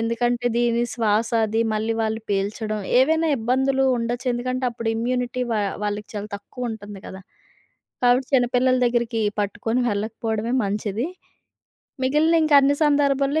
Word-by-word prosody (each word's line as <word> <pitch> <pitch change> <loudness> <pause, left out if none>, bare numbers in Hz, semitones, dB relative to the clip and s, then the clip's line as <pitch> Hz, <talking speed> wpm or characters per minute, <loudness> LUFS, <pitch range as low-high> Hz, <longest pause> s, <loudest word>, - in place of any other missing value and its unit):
ఎందుకంటే, 240 +1 0
దీని 235 0 +2
శ్వాస, 225 -1 +1 0.2
అది 220 +2 -1
మళ్ళీ 220 +1 -1
వాళ్ళు 220 +1 -1
పీల్చడం, 210 +2 -2 0.2
ఏవైనా 320 +4 +2
ఇబ్బందులు 265 +3 +1
ఉండొచ్చు. 240 +2 -3
ఎందుకంటే, 255 +2 -2
అప్పుడు 230 -1 -4
ఇమ్యూనిటీ 250 +1 -1
వా 215 - +1 0.2
వాళ్ళకి 205 0 -3
చాలా 205 0 -5
తక్కువుంటంది 210 -2 -7
కదా! 190 0 -9 0.8
కాబట్టి, 250 +1 +3
చిన్నపిల్లల 250 0 +3
దెగ్గరికి 235 -1 0 0.2
పట్టుకొని 225 +4 -1
వెళ్ళకపోవడమే 220 +2 -2
మంచిది. 205 +5 -2 1.0
మిగిలిన 300 +5 +3
ఇంకా 310 - +3
అన్ని 280 +1 +3
సందర్భాల్లో, 285 0 +2
235 Hz, 125 wpm, -23 LUFS, 220-255 Hz, 1.0 s, కాబట్టి